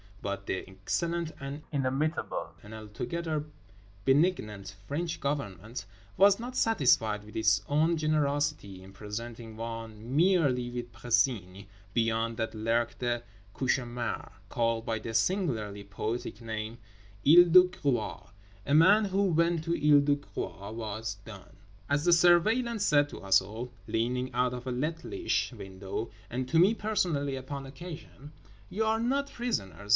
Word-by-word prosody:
But 100 0 -3
the 95 - -3
excellent 165 - -2
and 140 +2 -6
inimitable 140 +3 -1
and 105 +1 -12
altogether 150 +9 -4 0.6
benignant 110 - +1
French 165 +4 -2
Government 115 - -4 0.3
was 200 +2 +6
not 245 +2 -6
satisfied 115 - +3
with 105 - -14
its 110 -2 +3
own 160 +3 +2
generosity 145 -9 0
in 95 +1 -13
presenting 110 +2 -7
one 115 +1 -6
merely 150 -8 +3
with 120 -1 -5
Précigne—beyond 110 0 -1
that 110 -1 -2
lurked 115 +3 0
a 120 -1 0 0.3
cauchemar 120 -2 -2 0.2
called 115 -1 0
by 110 -1 -1
the 115 +1 -6
singularly 110 - 0
poetic 110 +3 -4
name: 110 0 -5 0.5
Isle 175 +4 +9
de 180 +2 +9
Groix. 140 -10 -2 0.4
A 140 - 0
man 205 +7 +6
who 195 0 +1
went 170 -2 +2
to 170 +1 -1
Isle 150 -2 +5
de 145 0 +3
Groix 105 -7 -6
was 110 -1 -4
done. 100 -5 -12 0.3
As 145 +2 +1
the 175 - +5
Surveillant 210 +7 +4
said 145 -6 +4
to - - -9
us 95 -1 +4
all, 110 +6 -7 0.2
leaning 125 +2 -1
out 125 0 +1
of 125 +1 -7
a - - -1
littlish 165 - -1
window, 100 +1 -6 0.2
and 125 +2 -3
to 160 - +2
me 190 +6 +6
personally 175 -10 0
upon 135 +1 -6
occasion— 150 0 -10 0.4
"You 220 +3 -1
are 220 0 +2
not 275 +4 0
prisoners. 105 - -3
125 Hz, 140 wpm, -29 LUFS, 110-165 Hz, 0.6 s, Isle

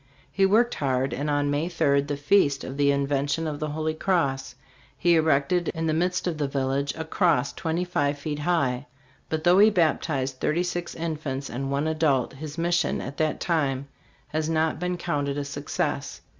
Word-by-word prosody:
He 195 -1 +3
worked 235 +5 +3
hard, 130 -2 0
and 145 +4 -2
on 145 0 +1
May 150 +4 0
3, 145 -5 +2
the 145 0 -4
feast 145 -2 +3
of 130 - -6
the 145 0 +3
Invention 140 +2 0
of 150 -2 -3
the 155 - -2
Holy 155 +1 -2
Cross, 140 -7 0 0.4
he 175 +3 +3
erected 160 +2 +2
in 160 0 -2
the 160 - +1
midst 180 +3 0
of 170 -4 -2
the 145 - +1
village 135 +1 -1
a 160 - -4
cross 160 -5 +1
twenty 165 +1 -2
five 145 -5 0
feet 150 +1 -4
high; 140 -5 0 0.4
but 160 -1 -2
though 180 +2 +5
he 210 +2 +8
baptised 155 -8 0
thirty 170 +4 +1
five 175 -1 -4
infants 150 -5 -4
and 135 +3 -3
one 140 +2 0
adult, 150 -6 +1
his 150 +3 -8
mission 170 -2 +1
at 135 +3 -6
that 155 -1 0
time 140 -5 0 0.4
has 155 0 -1
not 160 -1 +1
been 180 0 -2
counted 145 -5 -2
a 145 - -2
success. 140 - -3
150 Hz, 185 wpm, -26 LUFS, 140-170 Hz, 0.4 s, he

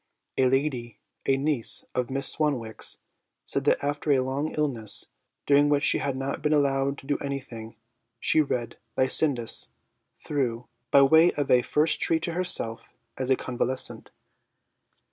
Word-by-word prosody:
A 130 - +3
lady, 125 -4 -1 0.3
a 135 - +3
niece 140 -4 0
of 125 -2 -1
Miss 135 +1 -1
Swanwick's, 130 -8 -1 0.5
said 140 - -2
that 145 - +2
after 145 +1 -1
a 135 -2 +4
long 135 +4 -2
illness, 125 -9 -1 0.4
during 145 +1 +4
which 145 -1 +2
she - - +4
had 140 -2 -2
not 135 +1 -3
been 150 - +1
allowed 140 -1 +1
to - - -13
do 145 +1 -1
anything, 120 -5 -6 0.4
she 155 - +3
read 125 -5 -3 0.2
'Lycidas' 130 -2 +1 0.5
through, 125 -5 -2 0.2
by 140 - +6
way 160 +5 +6
of 145 -2 -2
a 125 - +6
first 150 +5 +1
treat 160 0 +2
to 170 - -2
herself 175 -11 0 0.2
as 130 0 -3
a 130 - +5
convalescent. 130 +1 -3
135 Hz, 150 wpm, -26 LUFS, 125-145 Hz, 0.5 s, by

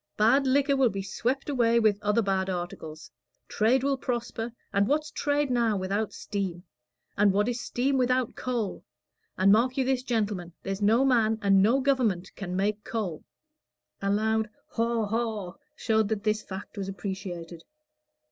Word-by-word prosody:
Bad 265 +6 +4
liquor 280 +1 +3
will 265 -3 +4
be 195 -2 -4
swept 250 +7 -2
away 235 -5 +3
with 215 -3 +2
other 210 +2 +2
bad 190 -1 0
articles. 170 -3 -6 0.4
Trade 240 +5 +2
will 275 -1 +1
prosper 240 -2 -3 0.2
and 200 0 +3
what's 300 +3 0
trade 290 -1 0
now 230 -4 +2
without 195 +3 -1
steam? 185 -4 -4 0.5
and 205 0 +4
what 205 +3 +1
is 245 0 -2
steam 265 +3 0
without 255 -1 +1
coal? 235 -6 -3 0.5
And 190 +1 +5
mark 245 +5 +3
you 265 - +2
this, 260 -1 +1
gentlemen 210 -8 -2
there's 195 +1 -3
no 225 +6 +4
man 225 -4 +3
and 195 -1 +5
no 235 +7 +3
government 235 -10 0
can 180 -3 -5
make 205 +2 0
coal." 200 -9 -4 0.8
A 195 - 0
loud 220 +2 +1 0.2
"Haw, 230 -1 0
haw," 215 -4 -2 0.2
showed 220 -2 +1
that 220 -2 -2
this 215 0 +1
fact 195 +2 -8
was 195 -1 -3
appreciated. 180 -3 -6
220 Hz, 160 wpm, -27 LUFS, 195-245 Hz, 0.8 s, And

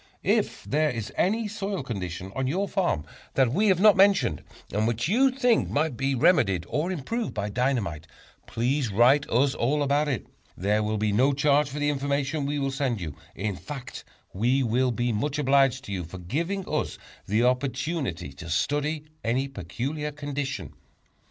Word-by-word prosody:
If - - +1
there 155 +2 +1
is 115 -5 -5
any 220 +4 +1
soil 200 -5 -3
condition 95 -5 -5
on 130 -1 -1
your 190 +9 0
farm 175 - 0 0.3
that 130 -3 +3
we 210 +7 +3
have 190 -3 +4
not 210 +1 +7
mentioned, 195 - +4 0.3
and 105 +2 +1
which 120 +3 0
you 255 +9 +4
think 250 -3 +2
might 150 -2 0
be 135 +2 0
remedied 120 - +3
or 160 +5 -1
improved 215 - -3
by 105 -1 -2
dynamite, 110 - -1 0.4
please 125 +1 0
write 125 +8 +4
us 130 +4 +3
all 145 +5 +1
about 145 +2 +2
it. 135 -6 -2 0.3
There 105 +3 +1
will 110 0 -1
be 105 0 +1
no 130 +7 +3
charge 145 +1 +3
for 145 - -6
the 145 0 +1
information 140 +1 -1
we 145 +1 -1
will 135 -1 -1
send 135 -5 -1
you; 80 -6 -5 0.2
in 100 0 -2
fact, 135 +5 -8 0.3
we 125 +7 +2
will 125 +2 +2
be 120 0 0
much 140 +7 -1
obliged 135 -2 +3
to 100 - -8
you 95 -2 -2
for 85 +3 -9
giving 165 - -3
us - - -2 0.3
the 110 +4 +2
opportunity 125 - -1
to 85 +4 -9
study 145 - 0 0.2
any 125 +4 0
peculiar 135 - -4
condition. 145 -1 -4
135 Hz, 175 wpm, -26 LUFS, 110-150 Hz, 0.4 s, not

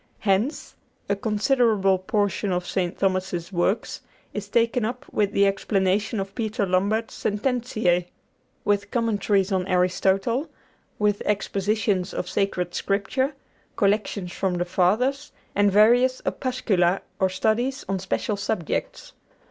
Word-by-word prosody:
Hence, 210 +8 0 0.4
a 200 - +2
considerable 210 -2 +2
portion 205 +1 0
of 180 0 -1
St. 180 0 -2
Thomas's 185 -2 -1
works 180 +4 0 0.3
is 205 -1 -5
taken 235 +2 +2
up 250 +5 -3
with 205 -2 +1
the 200 - +3
explanation 195 +2 +1
of 195 0 -4
Peter 220 -1 -1
Lombard's 200 +5 0
'Sententiæ,' 215 -6 0 0.6
with 205 0 +1
Commentaries 205 -4 +1
on 185 -1 0
Aristotle, 190 - +1 0.5
with 210 -1 +1
Expositions 205 -1 0
of 180 - -3
Sacred 180 -3 -1
Scripture, 260 +8 -1 0.4
collections 200 -2 0
from 185 -1 -1
the 175 0 -1
Fathers, 230 +11 +1 0.2
and 205 0 +3
various 240 +5 +5
opuscula 195 -8 +1 0.2
or 190 -1 +3
studies 220 +8 0
on 195 0 -1
special 180 - -2
subjects. 195 -4 -3
200 Hz, 120 wpm, -24 LUFS, 190-220 Hz, 0.6 s, various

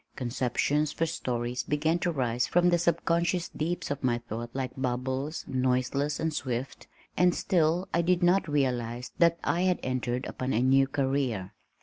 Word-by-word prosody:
Conceptions 135 +4 0
for 165 - 0
stories 125 -6 -2
began 155 +3 0
to 175 - 0
rise 125 -4 0
from 175 0 +3
the 175 -1 +3
subconscious 170 +1 +1
deeps 165 0 -3
of 140 -1 -4
my 120 -2 +2
thought 120 0 -6
like 130 -2 -2
bubbles, 130 +3 -2
noiseless 130 +3 0
and 160 -1 -1
swift 130 -1 -4 0.3
and 180 0 +3
still 175 0 +1
I 170 - +3
did 175 +1 +2
not 185 +1 +3
realize 125 -4 -1
that 170 -1 +5
I 175 - +1
had 185 -1 +2
entered 125 -1 -2
upon 130 +1 -3
a 115 - +2
new 135 +1 +4
career. 135 -8 -1
135 Hz, 160 wpm, -28 LUFS, 125-170 Hz, 0.3 s, that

